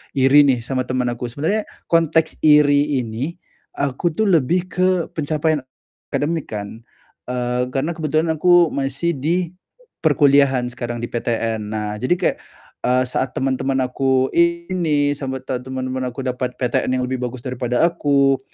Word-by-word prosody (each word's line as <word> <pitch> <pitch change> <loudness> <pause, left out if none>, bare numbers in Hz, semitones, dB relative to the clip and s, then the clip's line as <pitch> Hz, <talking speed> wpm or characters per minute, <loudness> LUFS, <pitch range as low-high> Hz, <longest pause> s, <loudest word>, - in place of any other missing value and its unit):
iri 140 +2 +6
nih 125 -4 +1
sama 130 +1 -2
temen 125 -1 0
aku, 120 +1 -4
sebenarnya 160 - -2 0.2
konteks 160 -1 +2
iri 150 -1 +4
ini, 120 +9 -4 0.4
aku 140 +4 -1
tuh 220 - +1
lebih 180 -1 +2
ke 185 +2 +2 0.2
pencapaian 155 0 0 0.5
akademik 160 +1 -2
kan, 105 +1 -6 0.5
eee, 125 0 -1
karena 140 +5 0
kebetulan 160 0 0
aku 175 -1 +5
masih 140 +5 -1
di 170 +4 -1 0.5
perkuliahan 140 -4 +4
sekarang 120 -1 -5
di 120 - -5
PTN. 115 -1 -1
Nah, 105 0 -3
jadi 130 +9 +1
kayak, - - 0 0.5
eee, 125 +1 +3
saat 125 +1 -2
teman-teman 135 0 -1
aku 130 +1 +1
ini 170 -4 +1
sama 130 -2 -5
te 130 -1 -3
teman-teman 130 0 -4
aku 125 +2 -6
dapat 125 -1 -3
PTN 130 0 0
yang 130 - 0
lebih 130 0 -3
bagus 125 0 -5
daripada 125 0 -1
aku, 140 -5 +2
135 Hz, 145 wpm, -20 LUFS, 125-155 Hz, 0.5 s, iri